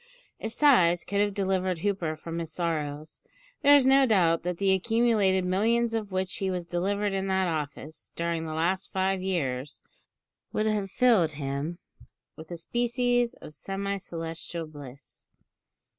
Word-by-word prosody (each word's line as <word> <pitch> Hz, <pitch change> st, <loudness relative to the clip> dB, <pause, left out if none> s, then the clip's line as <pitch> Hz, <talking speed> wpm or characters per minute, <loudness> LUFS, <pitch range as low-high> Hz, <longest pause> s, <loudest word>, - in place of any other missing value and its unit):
If 220 Hz, -, -4 dB
sighs 185 Hz, -, +4 dB
could 200 Hz, -, -2 dB
have 205 Hz, -1 st, 0 dB
delivered 190 Hz, -2 st, 0 dB
Hooper 185 Hz, -6 st, -1 dB
from 165 Hz, +2 st, -6 dB
his 165 Hz, -2 st, -5 dB
sorrows, 155 Hz, -3 st, -3 dB, 0.4 s
there 285 Hz, +1 st, +7 dB
is 280 Hz, -3 st, +5 dB
no 270 Hz, 0 st, +5 dB
doubt 170 Hz, -7 st, +3 dB
that 180 Hz, 0 st, -3 dB
the 195 Hz, 0 st, +2 dB
accumulated 200 Hz, -2 st, +2 dB
millions 225 Hz, +5 st, +1 dB
of 215 Hz, -3 st, -3 dB
which 185 Hz, -1 st, -2 dB
he 195 Hz, -, -1 dB
was 180 Hz, -2 st, -3 dB
delivered 200 Hz, +4 st, -1 dB
in 195 Hz, 0 st, -1 dB
that 190 Hz, -1 st, +1 dB
office, 155 Hz, -1 st, -5 dB
during 170 Hz, -1 st, -2 dB
the 155 Hz, -, -4 dB
last 175 Hz, +4 st, -1 dB
five 190 Hz, 0 st, 0 dB
years, 145 Hz, -7 st, -3 dB, 0.7 s
would 215 Hz, -, 0 dB
have 210 Hz, -2 st, 0 dB
filled 205 Hz, -9 st, +3 dB
him 140 Hz, +3 st, -4 dB, 0.6 s
with 160 Hz, 0 st, -11 dB
a 175 Hz, -, -6 dB
species 240 Hz, +5 st, 0 dB
of 150 Hz, -, -12 dB
semi 195 Hz, +5 st, -3 dB
celestial 165 Hz, -1 st, -6 dB
bliss. 145 Hz, -3 st, -12 dB
185 Hz, 155 wpm, -27 LUFS, 165-205 Hz, 0.7 s, there